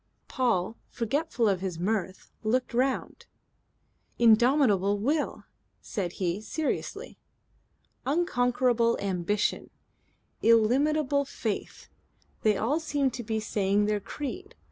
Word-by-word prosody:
Paul, 230 -5 0
forgetful 245 0 -1
of 190 -3 +1
his 185 -3 -3
mirth, 190 0 -2
looked 245 +4 0
round. 260 +2 -1 0.9
"'Indomitable 225 -4 +4
will," 290 +9 -1 0.4
said 185 -5 -4
he 185 +1 -2
seriously. 310 +7 -4 0.8
"Unconquerable 245 -6 +2
ambition, 200 +1 -1 0.7
illimitable 280 +6 +3
faith. 225 -6 -5 0.5
They 215 -2 +3
all 270 +10 +1
seem 290 -4 0
to 240 - -6
be 220 0 -2
saying 205 -1 +1
their 210 0 0
creed. 365 - -6
230 Hz, 100 wpm, -28 LUFS, 205-275 Hz, 0.9 s, Indomitable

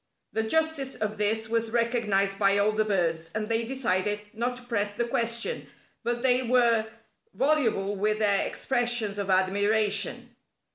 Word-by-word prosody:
The 220 - +1
justice 295 +2 0
of 215 0 -3
this 220 +2 0
was 230 0 -1
recognized 220 -4 0
by 200 -1 +3
all 205 +1 +3
the 215 0 +1
birds, 165 -6 -1
and 215 0 -2
they 230 0 +1
decided 210 -5 -1
not 240 +3 -2
to 250 - -8
press 205 -4 -2
the 235 - 0
question; 235 - -2 0.4
but 240 +1 -2
they 255 -1 +4
were 235 -3 +2 0.5
voluble 235 -9 +1
with 210 +2 0
their 205 -2 +2
expressions 240 -5 0
of 200 -1 -3
admiration. 200 +3 +1
220 Hz, 150 wpm, -27 LUFS, 205-240 Hz, 0.5 s, they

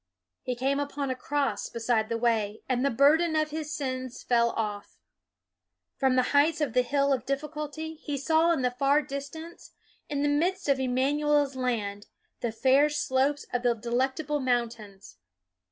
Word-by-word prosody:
He 250 - -3
came 270 +3 0
upon 285 -1 -3
a - - -2
cross 285 +2 -2
beside 230 -2 0
the 230 - -1
way, 220 -3 0
and 255 -1 0
the 280 - +3
burden 310 +7 +4
of 310 -1 +1
his 310 -1 -4
sins 255 -4 -4
fell 235 -1 +3
off. 210 -3 -4 1.0
From 265 -1 +2
the 255 - +4
heights 295 +2 +4
of 290 -7 -1
the 250 - +4
Hill 280 +1 +2
Difficulty, 300 +4 -4
he 300 -2 -5
saw 320 +4 +3
in 315 -6 0
the 250 - +2
far 275 +4 +2
distance, 285 +5 -8 0.4
in 285 -1 -1
the - - +2
midst 350 +6 0
of 275 -1 +2
Im 255 -1 -1
manuel's 290 +1 +2
Land, 215 -6 -2 0.3
the 235 - -2
fair 265 +6 +4
slopes 285 -1 0
of 245 - 0
the 245 -1 +2
Delectable 265 +6 -1
Mountains. 230 - -3
275 Hz, 165 wpm, -28 LUFS, 245-295 Hz, 1.0 s, burden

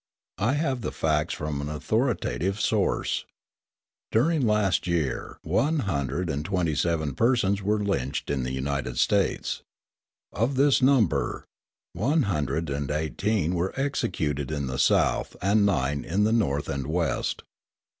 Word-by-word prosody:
I 115 +7 +2
have 140 -4 0
the - - -3
facts 75 0 0
from 75 -2 -3
an 70 - -4
authoritative 100 - -1
source. - - 0 0.9
During 140 +3 +2
last 105 -4 +2
year 80 -7 -1
one 150 +5 +1
hundred 85 - -1
and 75 -2 -2
twenty 90 -2 0
seven 80 -2 0
persons 100 - +2
were 105 +2 +1
lynched 70 -12 -2
in 70 -2 0
the 65 +1 -3
United 65 -1 -2
States. - - +1 0.7
Of 120 +7 0
this 140 +1 +4
number, 130 - +2 0.5
one 140 - +2
hundred 80 - -1
and 70 0 -2
eighteen 80 +4 0
were 90 +8 -2
executed 75 - -1
in 70 -2 -2
the 65 +1 -3
South - - +2
and 100 +2 +3
nine 70 -5 0
in 95 +5 0
the 110 +2 +3
North 75 -11 +1
and 70 -1 -3
West. 85 +1 -1
85 Hz, 140 wpm, -26 LUFS, 75-110 Hz, 0.9 s, this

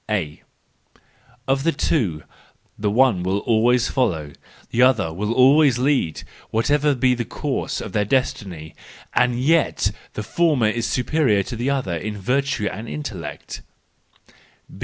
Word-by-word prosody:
—A: 90 -9 -2 0.6
" 125 +2 -33
Of 135 0 +1
the 165 +4 +2
two, 115 - -1 0.5
the 105 0 -1
one 115 -3 +3
will 95 +2 0
always 120 +3 +2
follow, 80 - -1 0.4
the 120 - +1
other 115 -10 +3
will 105 +5 -2
always 135 +2 +5
lead, 130 - 0 0.3
whatever 145 +5 +1
be 125 0 +2
the 120 -1 -2
course - - -3
of - - -6
their 105 - +1
destiny. 95 - -2 0.4
And 125 -1 +2
yet 155 +4 +2 0.2
the 105 - -4
former 145 -4 +2
is 115 +1 -2
superior 125 -6 +1
to 120 - -6
the 120 +4 -2
other 130 -11 -1
in 105 +6 -5
virtue 125 +2 -1
and 110 +4 -7
intellect." 110 - -7
120 Hz, 140 wpm, -21 LUFS, 105-135 Hz, 0.6 s, always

